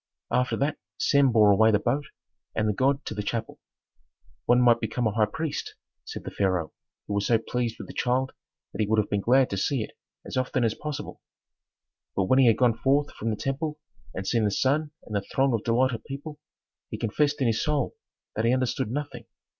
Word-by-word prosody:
After 125 0 +1
that 145 +2 -1 0.2
Sem 140 -2 +4
bore 105 -3 +6
away 110 +3 +5
the 105 - +4
boat 135 +7 -1 0.5
and 110 -1 +1
the 105 - +2
god 135 +5 +1
to - - -4
the 105 - -3
chapel. 110 +2 -4 0.9
"One 120 0 +5
might 120 -2 +5
become 115 +2 -2
a 110 - +2
high 105 0 +2
priest," 160 +7 -4 0.3
said - - -7
the - - -6
pharaoh, 95 -5 0 0.3
who - - -4
was 100 0 0
so 115 - +4
pleased 115 0 -3
with - - -7
the - - -9
child 130 +1 0 0.4
that - - -2
he 105 - +1
would 110 +1 +2
have 105 -1 +1
been 100 -1 +1
glad 130 +4 +4
to 100 - -1
see 125 +4 0
it - - -9 0.3
as - - -5
often 130 0 0
as 115 -2 +2
possible. 150 -2 -6 0.9
But 95 - +2
when 130 +8 +3
he 130 - +6
had 115 - +5
gone 120 -3 +2
forth 140 +3 +2
from 115 - -3
the 110 - 0
temple 150 +6 -3 0.3
and 95 - -5
seen 115 +2 +1
the 105 - +3
sun 140 +8 +1
and 105 - -7
the 100 - +1
throng 135 +6 +1
of 110 -2 0
delighted 120 0 +1
people, 150 +2 -7 0.5
he - - -5
confessed 145 +6 0
in 135 - +1
his 110 -1 +1
soul 150 -4 0 0.4
that 110 - 0
he 115 - +3
understood 130 -2 -1
nothing. 125 -3 -5
120 Hz, 215 wpm, -26 LUFS, 110-135 Hz, 0.9 s, bore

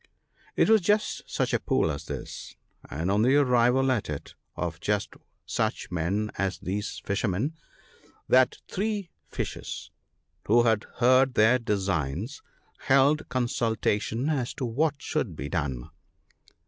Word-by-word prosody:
T - - +5
was 220 -2 +5
just 210 +4 +1
such - - -1
a - - +3
pool - - +1
as 75 +2 -6
this, - - -7 0.3
and 80 +6 -2
on 105 +1 +3
the 130 +5 +4
arrival 130 -1 +4
at 115 -10 -1
it 75 -2 -6 0.2
of 85 -1 -3
just 100 +1 -1 0.3
such - - -2
men 95 +5 -1
as 95 -4 0
these 100 +3 -4
fisher 100 +3 0
men, 105 - -1 0.7
that 130 0 +4
three 205 -2 -2 0.2
fishes, - - -5 0.6
who 120 +3 +5
had 110 -3 +2
heard 130 +1 +4
their 110 +4 +5
designs, 95 - -2 0.4
held 140 +3 +3
consultation 120 -1 0
as 135 -6 -1
to 130 - -3
what 145 +6 +1
should 125 - -2
be 70 - -5
done. 70 -8 -3
115 Hz, 135 wpm, -27 LUFS, 95-135 Hz, 0.7 s, T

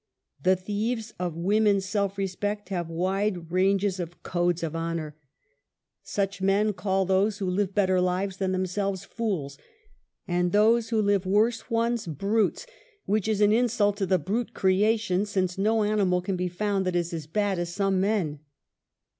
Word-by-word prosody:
The 185 0 +4
thieves 220 +4 -3
of 175 -3 -3
woman's 200 +2 +2
self 200 0 -1
respect 205 +1 -3
have 175 -4 -3
wide 185 0 -1
ranges 195 +1 +2
of 175 -1 -7
"codes 175 -1 0
of 165 -1 -3
honor." 165 -2 -3 0.9
Such 195 -2 -2
men 200 +2 +2
call 190 0 0
those 195 +3 +2
INTRODUCTION. 200 -1 -4
5 - - 0
who 190 - -1
live 200 -2 -1
better 185 -3 +3
lives 185 +1 -1
than 190 -1 -1
themselves, 185 +1 -1
fools, 175 -12 -3 0.7
and 175 -1 +1
those 225 +3 +3
who 225 -2 +1
live 200 -2 +1
worse 220 +4 +1
ones, 230 -2 0
brutes, 200 - 0 0.4
which 215 0 0
is 215 -2 0
an 205 0 +5
insult 225 -3 +2
to 195 -2 -1
the 185 - +3
brute 205 +9 -3
creation, 200 0 +2
since 190 -2 -1
no 220 +2 +2
animal 200 -4 +2
can 190 +1 -2
be 180 0 -1
found 195 +2 -1
that 180 - -1
is 175 -1 -1
as 160 -3 -5
bad 200 +1 0
as 175 0 -3
some 195 0 +1
men. 190 -8 0
195 Hz, 170 wpm, -26 LUFS, 180-210 Hz, 0.9 s, an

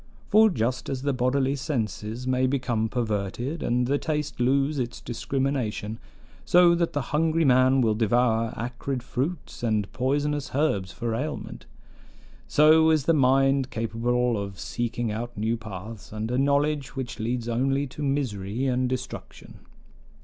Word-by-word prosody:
For 220 +1 +6
just 125 - -2
as 135 -1 -3
the 140 -1 +1
bodily 130 +2 +1
senses 120 - -3
may 130 0 +2
become 125 -4 0
perverted, 120 - -2
and 125 +1 +1
the 140 +3 +1
taste 150 -3 -3
lose 135 +4 +2
its 125 -1 -3
discrimination, 120 -4 -2 0.4
so 175 -1 +6
that 170 -1 0
the 145 -3 -3
hungry 160 +1 +2
man 130 0 +5
will 110 -3 +3
devour 115 +1 +2
acrid 125 +2 -4
fruits 140 +7 -4
and 110 -4 -1
poisonous 145 +2 -1
herbs 100 -11 +1
for 115 -1 -3
aliment, 145 +7 -5 0.8
so 160 +2 +5
is 155 -4 +2
the 165 - +4
mind 135 -1 +3
capable 115 0 0
of 100 -1 -7
seeking 120 -1 -2
out 120 +2 -5
new 110 +3 0
paths, 110 -1 -9
and 110 +2 -4
a 125 - 0
knowledge 140 0 +1
which 130 -3 -5
leads 120 +1 -2
only 135 +4 +1
to 140 +2 -9
misery 125 -5 -1
and 130 -1 +1
destruction. 130 -1 -7
125 Hz, 145 wpm, -26 LUFS, 115-140 Hz, 0.8 s, For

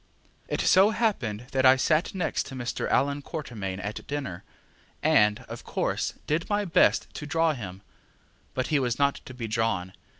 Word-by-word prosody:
It - - -1
so 190 +3 +6
happened 135 - -1
that 130 -1 +1
I 130 0 +8
sat 155 +8 +1
next 180 -4 -1
to 135 - -8
Mr. 120 -2 -3
Allan 140 +1 +2
Quatermain 110 - -5
at 105 +1 -6
dinner, 140 -12 -4 0.6
and, 105 +3 +4
of 115 -2 -9
course, - - -1
did 160 +6 -1
my 205 0 +1
best 170 - +4
to 150 - -6
draw 165 +1 +2
him; 100 -6 -8 0.7
but 130 - -1
he 150 -2 +3
was 125 -3 0
not 140 0 +1
to 130 - -9
be 115 -2 -4
drawn. 110 -5 -1
130 Hz, 170 wpm, -27 LUFS, 110-155 Hz, 0.7 s, I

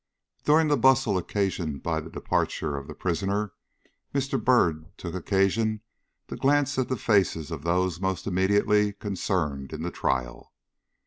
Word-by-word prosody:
During 155 +1 +5
the 145 -1 +3
bustle 130 -4 +4
occasioned 90 -5 -2
by 80 -1 0
the 80 +1 -8
departure 75 -2 -1
of 70 -1 -6
the - - -8
prisoner, 100 +3 -1 0.6
Mr. 135 -1 0
Byrd 80 -11 +3
took 85 -2 -6
occasion 100 +4 +1 0.5
to - - -6
glance 145 0 +2
at 130 - 0
the 130 - -1
faces 95 -9 +1
of - - -4
those 90 +1 0
most 95 -3 -1
immediately 100 +2 +2
concerned 85 -9 -2
in 80 +1 -5
the 90 - -3
trial. 60 -2 -2
95 Hz, 145 wpm, -26 LUFS, 80-110 Hz, 0.6 s, During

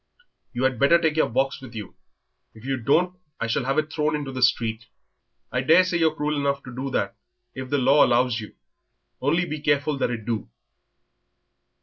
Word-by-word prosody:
"You 125 0 -3
had 130 -3 +1
better 155 +6 +5
take 160 -2 +1
your 160 - +2
box 135 +4 -1
with 125 -3 -11
you. 105 -3 -7 0.6
If 110 +2 -14
you 135 0 -1
don't 175 +9 +1 0.2
I'll 115 - -1
shall 115 +2 -1
have 135 +3 0
it 155 0 -1
thrown 150 0 0
into 145 -3 -4
the 130 -1 -5
street." 115 -2 +1 0.6
"I 125 - 0
daresay 170 +5 +4
you're 160 -1 +2
cruel 150 0 -1
enough 140 0 -1
to 125 -2 -10
do 135 +2 -3
that - - -1 0.4
if 130 0 -7
the 145 - +1
law 140 +3 +5
allows 120 -1 +2
you, 105 - -9 0.7
only 165 +6 +2
be 155 -2 -5
careful 145 -1 +1
that - - +1
it 115 -3 -5
do." 115 -3 -3
135 Hz, 195 wpm, -24 LUFS, 125-150 Hz, 0.7 s, better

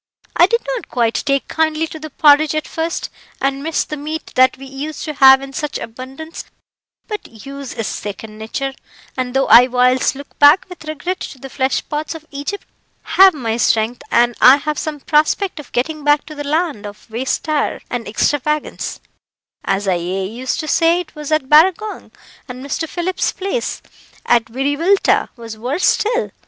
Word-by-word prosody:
"I 345 - +6
did 465 +3 +1
not - - -4
take - - -42 0.6
quite - - -41
kindly 320 0 0
to 320 0 -9
the 310 0 -7
porridge 300 +1 +4
at 310 - -2
first, 330 0 -3 0.3
and 275 0 -1
missed 320 +1 -2
the 300 - -3
meat 310 +2 -6
that 255 +1 +4
we 270 - -10
used 275 +3 -6
to 305 - -4
have 265 -1 +7
in 275 0 -9
such 300 0 -3
abundance; 265 +8 -8 0.6
but 275 - -8
use 275 -1 -7
is 225 -2 -3
second 215 +2 -6
nature, 270 +5 -4 0.4
and 255 -1 -3
though 270 - +3
I 235 +3 +8
whiles 250 +1 +2
look 280 +1 -12
back 290 +5 +7
with 360 -3 -11
regret 310 +5 -3
to - - -7
the 270 0 -10
flesh 265 0 -1
pots 300 +2 -3
of 315 -1 -10
Egypt, 285 +9 -5 0.4
I - - -15
have 380 -2 +7
my 230 -5 -2
strength, 230 +1 +1
and 240 0 +3
I 255 - +9
have 300 +1 -3
some 300 -2 -4
prospect 315 +5 +1
of 295 - -11
getting 300 +5 -2
back 295 0 +3
to 310 - -9
the 290 -1 -6
land 295 -7 -1
of 205 +1 -12
wastrie 265 +5 -1
and 245 -2 -3
extravagance, 295 +6 -1 0.6
as 195 +1 -1
I 185 -2 +2
aye 185 +3 -3
used 240 +6 -3
to 310 - -7
say 330 +3 +3
it 350 -3 -7
was 300 0 -7
at 310 -4 +1
Barragong; 370 +8 +3 0.4
and 255 +1 -8
Mr. 310 +3 -3
Phillips's 365 +1 -1
place, 395 +5 -3 0.4
at 235 -2 +3
Wiriwilta, 285 - +1
was 230 -3 -9
worse 270 +10 -1
still. 470 +3 +1
285 Hz, 180 wpm, -18 LUFS, 250-315 Hz, 0.6 s, I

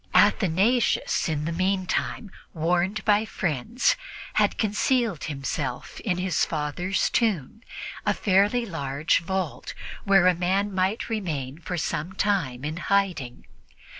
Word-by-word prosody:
Athanasius, 205 +3 +3
in 150 -1 -1
the 165 - -1
meantime, 185 +3 -1 0.2
warned 175 +6 0
by 210 -1 +4
friends, 195 - 0 0.4
had - - +2
concealed 220 - +1
himself 135 -3 -4
in 185 -6 -1
his 185 0 +1
father's 165 +5 -1
tomb, 215 - 0 0.4
a - - +1
fairly 205 +5 +3
large 145 -4 0
vault, 185 -2 -3 0.3
where 195 -2 +5
a 185 - +6
man 190 +4 0
might 190 +4 0
remain 155 - -3
for 175 +1 -4
some 165 +2 -2
time 170 -11 0
in 155 +2 -3
hiding. 180 -10 0
185 Hz, 120 wpm, -26 LUFS, 155-205 Hz, 0.4 s, a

